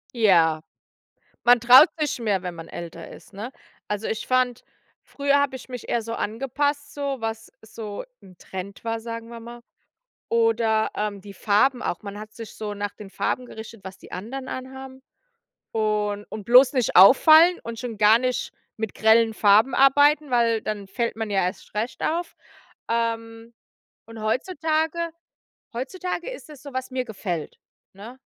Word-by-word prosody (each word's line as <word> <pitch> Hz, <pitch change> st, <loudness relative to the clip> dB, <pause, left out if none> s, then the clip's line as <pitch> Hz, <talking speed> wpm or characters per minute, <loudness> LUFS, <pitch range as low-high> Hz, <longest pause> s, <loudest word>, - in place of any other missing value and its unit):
Ja. 170 Hz, -8 st, +4 dB, 0.8 s
Man 240 Hz, 0 st, +6 dB
traut 250 Hz, +5 st, +8 dB
sich 300 Hz, -4 st, -1 dB
mehr, 205 Hz, -5 st, 0 dB
wenn 180 Hz, -2 st, -5 dB
man 165 Hz, -1 st, -10 dB
älter 170 Hz, -1 st, -8 dB
ist, -, -, -14 dB
ne? 215 Hz, +6 st, -7 dB, 0.4 s
Also, 210 Hz, +1 st, -3 dB
ich 220 Hz, -, -3 dB
fand, 255 Hz, -1 st, +1 dB, 0.4 s
früher 280 Hz, 0 st, +1 dB
habe 280 Hz, -2 st, 0 dB
ich 255 Hz, -, -13 dB
mich 250 Hz, -2 st, -8 dB
eher 235 Hz, -, 0 dB
so 230 Hz, +1 st, -6 dB
angepasst, 285 Hz, +6 st, -2 dB
so 280 Hz, -3 st, -3 dB
was 225 Hz, 0 st, -5 dB
so 215 Hz, -1 st, -7 dB, 0.2 s
'n 185 Hz, -2 st, -16 dB
Trend 190 Hz, +3 st, -8 dB
war, 225 Hz, 0 st, -2 dB
sagen 230 Hz, 0 st, -7 dB
wir 235 Hz, 0 st, -9 dB
mal. 235 Hz, +1 st, -11 dB, 0.7 s
Oder, 225 Hz, -1 st, +2 dB
ähm, 210 Hz, -1 st, -3 dB
die 200 Hz, 0 st, -11 dB
Farben 245 Hz, +7 st, +2 dB
auch. 175 Hz, -, -3 dB
Man 200 Hz, 0 st, -7 dB
hat 215 Hz, 0 st, -10 dB
sich 225 Hz, -2 st, -10 dB
so 210 Hz, -1 st, -5 dB
nach 205 Hz, 0 st, -4 dB
den 205 Hz, -2 st, -11 dB
Farben 250 Hz, +5 st, -2 dB
gerichtet, 220 Hz, -2 st, -10 dB
was 190 Hz, 0 st, -9 dB
die -, -, -16 dB
anderen 255 Hz, +9 st, -6 dB
anhaben 265 Hz, 0 st, -8 dB, 0.7 s
und 210 Hz, -2 st, -1 dB
und 215 Hz, -1 st, -7 dB
bloß 250 Hz, +3 st, +7 dB
nicht 250 Hz, -4 st, +1 dB
auffallen 315 Hz, -, +8 dB
und 230 Hz, 0 st, -7 dB
schon 235 Hz, -2 st, -5 dB
gar 215 Hz, +2 st, +6 dB
nicht 255 Hz, 0 st, -2 dB, 0.2 s
mit 220 Hz, -1 st, -4 dB
grellen 225 Hz, +1 st, +4 dB
Farben 215 Hz, +4 st, +4 dB
arbeiten, 290 Hz, +2 st, +4 dB
weil 230 Hz, -2 st, +2 dB
dann 210 Hz, -2 st, -5 dB
fällt 235 Hz, +4 st, -2 dB
man 225 Hz, -1 st, -4 dB
ja 195 Hz, -2 st, +1 dB
erst 180 Hz, -, -5 dB
recht 230 Hz, +3 st, -3 dB
auf. 340 Hz, +2 st, -2 dB, 0.5 s
Ähm. 230 Hz, 0 st, -3 dB, 0.5 s
Und 225 Hz, -1 st, -10 dB
heutzutage 320 Hz, -, -1 dB, 0.6 s
heutzutage 360 Hz, -, -4 dB
ist -, -, -10 dB
es 300 Hz, -1 st, -13 dB
so, 280 Hz, -, -10 dB
was 260 Hz, 0 st, -4 dB
mir 255 Hz, -1 st, -2 dB
gefällt, 185 Hz, -8 st, -5 dB, 0.3 s
ne? 220 Hz, +7 st, -11 dB
230 Hz, 165 wpm, -24 LUFS, 210-260 Hz, 0.8 s, traut